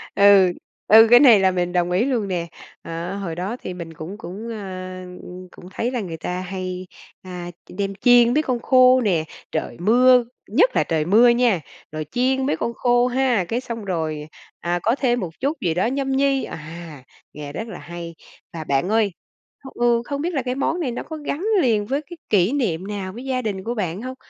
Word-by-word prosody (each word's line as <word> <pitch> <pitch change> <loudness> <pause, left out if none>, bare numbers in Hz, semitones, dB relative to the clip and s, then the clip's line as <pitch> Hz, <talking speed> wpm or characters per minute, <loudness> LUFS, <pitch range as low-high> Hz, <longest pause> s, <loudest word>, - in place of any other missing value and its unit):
Ừ. 200 -2 +6 0.4
Ừ, 220 +2 +8
cái 245 +1 +8
này 245 -7 +7
là 190 -1 +3
mình 180 -1 -2
đồng 175 -1 +1
ý 190 +7 +2
luôn 240 -7 -1
nè. 175 -3 -2 0.3
Ờ, 170 +3 -5
hồi 175 -5 -4
đó 190 +7 -4
thì 185 - -5
mình 170 -2 -8
cũng 170 +7 -8
cũng, 215 +5 -8
a, 185 -3 -7 0.5
cũng 180 - -13
thấy 240 +2 -2
là 250 - -2
người 170 -5 -6
ta 180 +2 -4
hay, 185 0 -5 0.3
a, 180 -1 -7 0.2
đem 195 +1 -3
chiên 245 +2 +5
mấy 305 +3 +2
con 255 -4 -1
khô 255 +1 +5
nè. 180 -8 +1 0.3
Trời - - -3
mưa 245 +5 +5 0.2
nhất - - +3
là - - +3
trời 155 -2 -1
mưa 225 +7 +6
nha, 235 -7 +3 0.3
rồi 155 0 -4
chiên 260 +2 +1
mấy 285 - 0
con 235 - -2
khô 245 0 +2
ha, 250 -6 +1
cái 235 +7 -2
xong 230 -4 -6
rồi, 160 -5 -3 0.3
à, 175 +1 -1
có 230 +4 +2
thêm 245 -3 +1
một 180 - -3
chút 285 +4 -1
gì 170 -3 0
đó 180 +3 0
nhâm 270 +2 -1
nhi. 275 0 +2
À, 160 -2 -9 0.3
nghe 145 -1 -8
rất 225 +7 -5
là - - -8
hay. 170 +2 -8 0.4
Và 165 -2 -5
bạn 140 +4 0
ơi, 215 -2 +2 0.6
ừ, 240 -1 +2
không 280 0 -4
biết 350 +3 -2
là 275 - 0
cái 250 0 -2
món 320 +5 -1
này 285 -8 -1
nó 240 - -5
có 315 - -7
gắn 300 +4 -4 0.2
liền 220 -6 +2
với 275 +6 -1
cái 325 +3 -12
kỷ 195 0 +3
niệm 195 - -1
nào 195 -2 -5
với 245 +5 -9
gia 260 -1 -1
đình 200 -5 -4
của 235 +3 -3
bạn 185 -3 -3
hông? 255 +1 -6
210 Hz, 210 wpm, -22 LUFS, 180-250 Hz, 0.6 s, Ừ